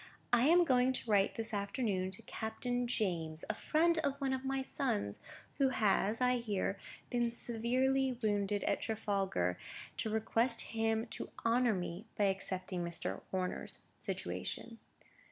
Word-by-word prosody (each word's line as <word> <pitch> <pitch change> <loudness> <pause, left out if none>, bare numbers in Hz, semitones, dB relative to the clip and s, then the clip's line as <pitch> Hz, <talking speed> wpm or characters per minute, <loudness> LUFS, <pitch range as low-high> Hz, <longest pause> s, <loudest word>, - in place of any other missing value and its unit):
I 240 +3 +6
am 345 +2 +6
going 255 -2 +4
to 235 -3 -4
write 200 -1 +4
this 225 -1 -1
afternoon 200 -2 0
to 190 - -8
Captain 245 +2 -2
James, 170 -9 -1
a - - -4
friend 330 +1 +2
of 280 -3 -1
one 270 -1 0
of 260 0 -2
my 270 0 -1
sons, 235 - -1 0.4
who 270 -1 +5
has, 215 -2 +2
I 250 0 +3
hear, 205 -4 -1 0.3
been 240 -1 +2
severely 255 +3 +1
wounded 205 -1 +1
at - - +1
Trafalgar, 195 - 0 0.4
to 220 - -1
request 225 +2 +2
him 225 0 0
to - - -4 0.2
honour 235 -1 +4
me 180 +3 -4
by 210 - +3
accepting 190 -2 -1
Mr. 170 0 -3
Horner's 185 -1 -3 0.2
situation." 230 -1 -4
225 Hz, 145 wpm, -35 LUFS, 195-250 Hz, 0.4 s, I